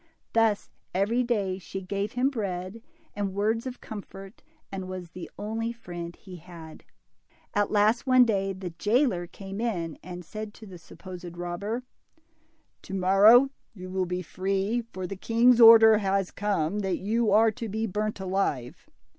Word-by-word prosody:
Thus 225 Hz, -3 st, +2 dB, 0.2 s
every 210 Hz, +6 st, +2 dB
day 205 Hz, -6 st, -1 dB
she 190 Hz, +1 st, -6 dB
gave 200 Hz, +3 st, -3 dB
him 255 Hz, +3 st, +1 dB
bread, 195 Hz, -2 st, -4 dB, 0.3 s
and 200 Hz, -2 st, -3 dB
words 220 Hz, +4 st, 0 dB
of 250 Hz, -1 st, -7 dB
comfort, 195 Hz, -1 st, -10 dB, 0.3 s
and 190 Hz, -1 st, -5 dB
was 180 Hz, -3 st, -7 dB
the 180 Hz, -1 st, -8 dB
only 225 Hz, +2 st, -3 dB
friend 175 Hz, -7 st, -8 dB
he 185 Hz, -3 st, -12 dB
had. 165 Hz, -2 st, -12 dB, 0.7 s
At 205 Hz, -1 st, +1 dB
last, 215 Hz, +4 st, +2 dB
one 255 Hz, -1 st, +6 dB
day, 195 Hz, -4 st, 0 dB
the 185 Hz, -2 st, -6 dB
jailer 205 Hz, -, +1 dB
came 195 Hz, +3 st, -8 dB
in 175 Hz, -9 st, -3 dB
and 180 Hz, -1 st, -8 dB
said 215 Hz, +3 st, -7 dB
to 220 Hz, -, -12 dB
the 185 Hz, -4 st, -11 dB
supposed 175 Hz, +1 st, -10 dB
robber, 200 Hz, +8 st, -4 dB, 1.0 s
To 195 Hz, -, -7 dB
morrow 205 Hz, +8 st, +6 dB, 0.2 s
you 185 Hz, -1 st, -8 dB
will 185 Hz, -1 st, -1 dB
be 180 Hz, +1 st, -3 dB
free, 195 Hz, +6 st, -1 dB
for 185 Hz, 0 st, -5 dB
the 195 Hz, -, -5 dB
king's 235 Hz, +4 st, +4 dB
order 225 Hz, -1 st, +9 dB
has 195 Hz, -2 st, 0 dB
come 200 Hz, -2 st, -1 dB
that 190 Hz, -3 st, -1 dB
you 220 Hz, +3 st, 0 dB
are 220 Hz, +2 st, +5 dB
to 230 Hz, 0 st, -6 dB
be 220 Hz, +3 st, -2 dB
burnt 210 Hz, +1 st, -2 dB
alive." 185 Hz, -, -2 dB
200 Hz, 160 wpm, -27 LUFS, 185-225 Hz, 1.0 s, order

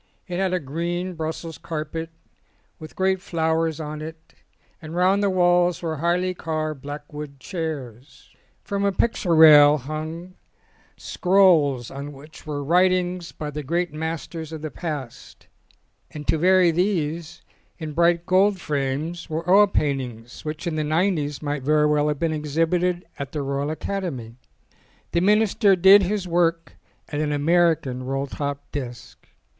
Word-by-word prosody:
It 180 Hz, -1 st, -3 dB
had 190 Hz, -1 st, +1 dB
a 185 Hz, -, +1 dB
green 170 Hz, +5 st, -3 dB
Brussels 160 Hz, 0 st, -5 dB
carpet, 160 Hz, +1 st, -5 dB, 0.7 s
with 155 Hz, -1 st, -11 dB
great 190 Hz, 0 st, +1 dB
flowers 160 Hz, -3 st, -1 dB
on 150 Hz, -1 st, -5 dB
it, 160 Hz, +1 st, -10 dB, 0.5 s
and 160 Hz, +1 st, -8 dB
round 185 Hz, +3 st, +3 dB
the 200 Hz, -, +2 dB
walls 175 Hz, -1 st, +2 dB
were 160 Hz, -2 st, -2 dB
highly 175 Hz, +4 st, 0 dB
carved 155 Hz, -4 st, -3 dB
black 145 Hz, +1 st, -8 dB
wood 145 Hz, -2 st, -8 dB
chairs. 140 Hz, -, -7 dB, 0.3 s
From 200 Hz, 0 st, -2 dB
a 200 Hz, -, +2 dB
picture 190 Hz, -4 st, 0 dB
rail 150 Hz, -2 st, +8 dB
hung 155 Hz, +6 st, -6 dB, 0.6 s
scrolls 170 Hz, -10 st, +3 dB
on 140 Hz, +2 st, -7 dB
which 150 Hz, +3 st, -14 dB
were 145 Hz, -1 st, -3 dB
writings 180 Hz, +2 st, +1 dB
by 150 Hz, -1 st, -6 dB
the 150 Hz, +1 st, -5 dB
great 170 Hz, +3 st, -2 dB
masters 160 Hz, 0 st, -5 dB
of 160 Hz, -1 st, -7 dB
the 155 Hz, -, -4 dB
past, 145 Hz, -8 st, -7 dB, 0.6 s
and 150 Hz, -1 st, -9 dB
to 160 Hz, -, +2 dB
vary 185 Hz, 0 st, +5 dB
these, 170 Hz, -2 st, -2 dB, 0.3 s
in 155 Hz, -2 st, -6 dB
bright 170 Hz, +1 st, +2 dB
gold 190 Hz, +1 st, +3 dB
frames, 150 Hz, +3 st, -3 dB
were 160 Hz, +2 st, -4 dB
oil 200 Hz, +3 st, +6 dB
paintings 130 Hz, -, -3 dB
which 155 Hz, +2 st, -5 dB
in 165 Hz, -2 st, -2 dB
the 155 Hz, -, 0 dB
nineties 155 Hz, -2 st, 0 dB
might 145 Hz, -1 st, -2 dB
very 150 Hz, +3 st, +3 dB
well 150 Hz, 0 st, +2 dB
have 150 Hz, -1 st, -1 dB
been 160 Hz, +2 st, -1 dB
exhibited 165 Hz, +4 st, 0 dB
in 140 Hz, -, -3 dB
the 150 Hz, -2 st, -3 dB
Royal 140 Hz, +1 st, -2 dB
Academy. 155 Hz, -, -4 dB, 0.8 s
The 170 Hz, -, +1 dB
minister 210 Hz, 0 st, +4 dB
did 190 Hz, +3 st, +7 dB
his 195 Hz, 0 st, -1 dB
work 165 Hz, -1 st, 0 dB, 0.4 s
at 145 Hz, -, -3 dB
an 150 Hz, -1 st, -1 dB
American 150 Hz, -4 st, +2 dB
roll 135 Hz, +2 st, -2 dB
top 140 Hz, 0 st, -4 dB
desk. 125 Hz, -4 st, -7 dB
160 Hz, 150 wpm, -23 LUFS, 150-180 Hz, 0.8 s, rail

